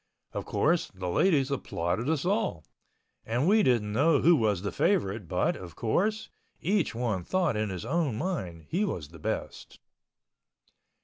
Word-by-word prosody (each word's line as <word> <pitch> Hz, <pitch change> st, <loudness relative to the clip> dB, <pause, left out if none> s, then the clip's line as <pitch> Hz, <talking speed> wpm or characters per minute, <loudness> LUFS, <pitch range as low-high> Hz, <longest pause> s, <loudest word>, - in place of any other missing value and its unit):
Of -, -, -4 dB
course, 170 Hz, +2 st, +1 dB
the 95 Hz, -1 st, -5 dB
ladies 140 Hz, -, +3 dB
applauded 115 Hz, -, -2 dB
us 160 Hz, -2 st, 0 dB
all—and 145 Hz, -, -3 dB
we 215 Hz, +3 st, +5 dB
didn't 115 Hz, -, +2 dB
know 145 Hz, +5 st, +4 dB
who 170 Hz, +2 st, +6 dB
was 105 Hz, -, +1 dB
the 100 Hz, -, -2 dB
favorite 100 Hz, -, 0 dB
but, -, -, +1 dB
of 85 Hz, -3 st, -10 dB
course, 210 Hz, -, 0 dB, 0.3 s
each 185 Hz, -, 0 dB
one 115 Hz, -6 st, -1 dB
thought 185 Hz, -, 0 dB
in 105 Hz, 0 st, -1 dB
his 95 Hz, +2 st, -5 dB
own 145 Hz, -2 st, 0 dB
mind 95 Hz, -, -3 dB
he 185 Hz, +6 st, +1 dB
was 85 Hz, -, -3 dB
the 85 Hz, 0 st, -13 dB
best. -, -, -5 dB
125 Hz, 150 wpm, -28 LUFS, -, 0.3 s, who